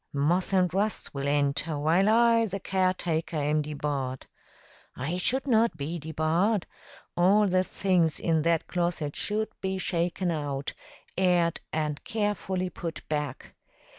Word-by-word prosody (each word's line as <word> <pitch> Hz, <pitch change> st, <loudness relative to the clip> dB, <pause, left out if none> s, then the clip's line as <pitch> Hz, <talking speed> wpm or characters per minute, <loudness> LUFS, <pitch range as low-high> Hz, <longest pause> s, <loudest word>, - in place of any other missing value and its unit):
Moth 165 Hz, +8 st, +1 dB
and 185 Hz, -2 st, +2 dB
rust 205 Hz, +3 st, -1 dB
will 140 Hz, 0 st, -3 dB
enter, 145 Hz, +2 st, +1 dB
while 165 Hz, +7 st, +3 dB
I, 230 Hz, 0 st, +4 dB
the 195 Hz, 0 st, -4 dB
caretaker, 180 Hz, -4 st, 0 dB
am 150 Hz, +1 st, +1 dB
debarred. 140 Hz, -3 st, -3 dB, 0.7 s
I 155 Hz, +8 st, -3 dB
should 260 Hz, +9 st, +1 dB
not 225 Hz, -, +3 dB
be 160 Hz, +4 st, -4 dB
debarred. 160 Hz, +6 st, 0 dB, 0.5 s
All 195 Hz, +4 st, +4 dB
the 185 Hz, -1 st, +2 dB
things 180 Hz, -5 st, +1 dB
in 160 Hz, -2 st, +1 dB
that 165 Hz, 0 st, +1 dB
closet 170 Hz, -4 st, -2 dB
should 215 Hz, +1 st, -1 dB
be 190 Hz, 0 st, -1 dB
shaken 175 Hz, 0 st, 0 dB
out, 145 Hz, -3 st, -3 dB, 0.5 s
aired, 175 Hz, -3 st, +2 dB
and 150 Hz, -2 st, -2 dB
carefully 190 Hz, -4 st, -2 dB
put 165 Hz, -2 st, -6 dB
back. 150 Hz, -4 st, -3 dB
170 Hz, 135 wpm, -27 LUFS, 150-190 Hz, 0.7 s, I